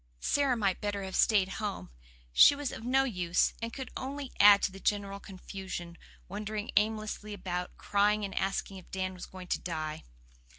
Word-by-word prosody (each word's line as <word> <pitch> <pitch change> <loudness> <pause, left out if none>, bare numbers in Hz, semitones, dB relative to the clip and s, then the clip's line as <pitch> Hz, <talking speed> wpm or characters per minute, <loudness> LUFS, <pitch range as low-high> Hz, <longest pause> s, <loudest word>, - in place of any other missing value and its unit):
Sara 275 - +2
might 195 -4 0
better 205 -1 -2
have 190 0 -5
stayed 205 -4 +4
home; 205 - -4 0.4
she 285 - +8
was 285 -2 -3
of - - -8
no 265 +3 +3
use, 180 -8 +1
and 230 0 -3
could 265 +2 -7
only 275 0 -5
add 205 0 +8
to - - +2
the 195 - -10
general 200 -1 -1
confusion, 185 -3 -7 0.3
wandering 210 +2 -4
aimlessly 215 0 0
about, 180 -2 -4
crying 205 +1 +2
and 195 - -6
asking 195 0 -2
if 185 - -13
Dan 185 0 -2
was 180 - -8
going 185 -1 -10
to - - +1
die. 155 -3 -4
200 Hz, 175 wpm, -31 LUFS, 185-215 Hz, 0.4 s, she